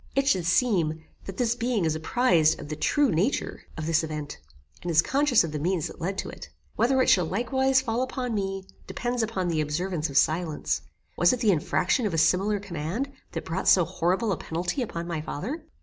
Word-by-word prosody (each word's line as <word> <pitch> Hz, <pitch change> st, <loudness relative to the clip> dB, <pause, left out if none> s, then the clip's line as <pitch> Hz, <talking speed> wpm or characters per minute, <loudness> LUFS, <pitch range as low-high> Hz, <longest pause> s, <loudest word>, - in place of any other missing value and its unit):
It 275 Hz, 0 st, +2 dB
should 185 Hz, -11 st, +2 dB
seem, 175 Hz, -7 st, +1 dB, 0.2 s
that 195 Hz, -1 st, -7 dB
this 235 Hz, -2 st, +2 dB
being 235 Hz, -5 st, 0 dB
is 160 Hz, -, +1 dB
apprised 160 Hz, -1 st, +2 dB
of 145 Hz, -, -8 dB
the 155 Hz, -, -3 dB
true 280 Hz, -, +2 dB
nature 185 Hz, -, -1 dB
of 155 Hz, -, -4 dB
this 165 Hz, 0 st, +2 dB
event, 155 Hz, -2 st, -5 dB, 0.4 s
and 175 Hz, -, -4 dB
is 160 Hz, -2 st, +3 dB
conscious 275 Hz, -5 st, +3 dB
of 165 Hz, -, -4 dB
the 150 Hz, -, -3 dB
means 175 Hz, +1 st, 0 dB
that -, -, -8 dB
led 190 Hz, +3 st, -2 dB
to -, -, -3 dB
it. -, -, -10 dB, 0.3 s
Whether 250 Hz, +4 st, +2 dB
it -, -, -1 dB
shall 180 Hz, -4 st, +4 dB
likewise 265 Hz, +7 st, +2 dB
fall 230 Hz, +2 st, -1 dB
upon 255 Hz, -2 st, -3 dB
me, 195 Hz, -2 st, -2 dB, 0.2 s
depends 245 Hz, 0 st, -2 dB
upon 210 Hz, -5 st, -1 dB
the 160 Hz, -3 st, 0 dB
observance 160 Hz, +2 st, -2 dB
of 140 Hz, -, -2 dB
silence. 160 Hz, 0 st, +1 dB, 0.4 s
Was 175 Hz, +6 st, +5 dB
it 250 Hz, -, -2 dB
the 220 Hz, -3 st, +3 dB
infraction 180 Hz, -, +1 dB
of 180 Hz, -, -3 dB
a -, -, 0 dB
similar 190 Hz, +6 st, +2 dB
command, 195 Hz, -, -4 dB, 0.2 s
that 165 Hz, -, -4 dB
brought 170 Hz, +4 st, -3 dB
so 180 Hz, -3 st, +6 dB
horrible 190 Hz, +8 st, 0 dB
a 185 Hz, -, 0 dB
penalty 175 Hz, -, -3 dB
upon 170 Hz, -8 st, -4 dB
my 170 Hz, -3 st, -3 dB
father? 245 Hz, -, -5 dB
185 Hz, 210 wpm, -26 LUFS, 160-235 Hz, 0.4 s, so